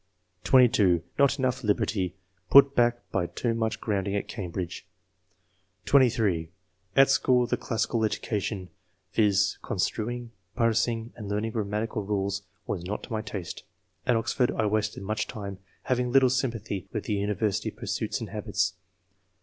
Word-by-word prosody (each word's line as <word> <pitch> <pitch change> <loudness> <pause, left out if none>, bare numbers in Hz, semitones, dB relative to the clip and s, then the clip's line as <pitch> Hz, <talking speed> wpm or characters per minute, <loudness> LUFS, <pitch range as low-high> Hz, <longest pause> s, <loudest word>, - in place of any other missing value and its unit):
(22) 110 -10 +5
" - - -22
Not 140 0 +4
enough 130 -1 -1
liberty; 100 -3 0 0.3
put 140 0 +8
back 120 -1 +2
by 90 -2 0
too 115 +5 -1
much 115 -1 -1
grounding 100 -2 -1
at 100 - -2
Cambridge/' 90 -4 -5 1.0
(23) 110 - +3 0.2
" 95 0 -41
At 135 0 +6
school 125 -2 +3
the - - 0
classical 115 0 -1
education, 105 -3 -2 0.4
viz., 105 -1 +2
construing, 120 +2 -2 0.2
parsing 115 -1 +1
and 105 -3 -7
learning 105 +2 -1
grammatical 110 +1 -2
rules, 100 0 -1 0.2
was 85 - -3
not 100 +4 -4
to - - -10
my 110 - -1
taste. 100 -5 -6 0.5
At 125 - +4
Oxford 120 +2 +1
I 110 - 0
wasted 105 -1 -1
much 110 +2 -2
time, 100 -4 -6 0.2
having 125 -1 0
little 130 -1 +5
sympathy 115 -7 -2
with 105 - -3
the 105 - -2
university 105 0 0
pursuits - - -3
and - - -6
habits." - - -1
110 Hz, 145 wpm, -27 LUFS, 100-120 Hz, 1.0 s, put